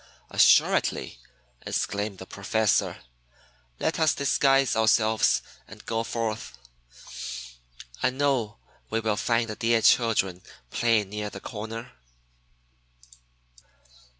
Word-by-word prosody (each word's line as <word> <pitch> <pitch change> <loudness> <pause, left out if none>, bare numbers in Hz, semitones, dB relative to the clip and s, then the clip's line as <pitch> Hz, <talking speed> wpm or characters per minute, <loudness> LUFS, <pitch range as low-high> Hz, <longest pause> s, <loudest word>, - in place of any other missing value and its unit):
"Assuredly!" - - +3 0.4
exclaimed 100 -1 -2
the 95 - -9
Professor. 100 +2 0 0.8
"Let 160 - -1
us 160 -1 +3
disguise 135 -2 +2
ourselves 110 0 +3 0.2
and - - -13
go 115 0 -1
forth. 115 - -4 1.4
I 130 - +3
know 130 - 0
that - - -34 0.2
we 115 - 0
will 110 -2 0
find 115 +2 0
the 110 - -5
dear 115 0 +1
children 105 -7 +3 0.3
playing 115 -4 +1
near 105 0 -4
the - - -9
corner." 115 +1 -7
110 Hz, 100 wpm, -26 LUFS, 105-120 Hz, 1.4 s, Assuredly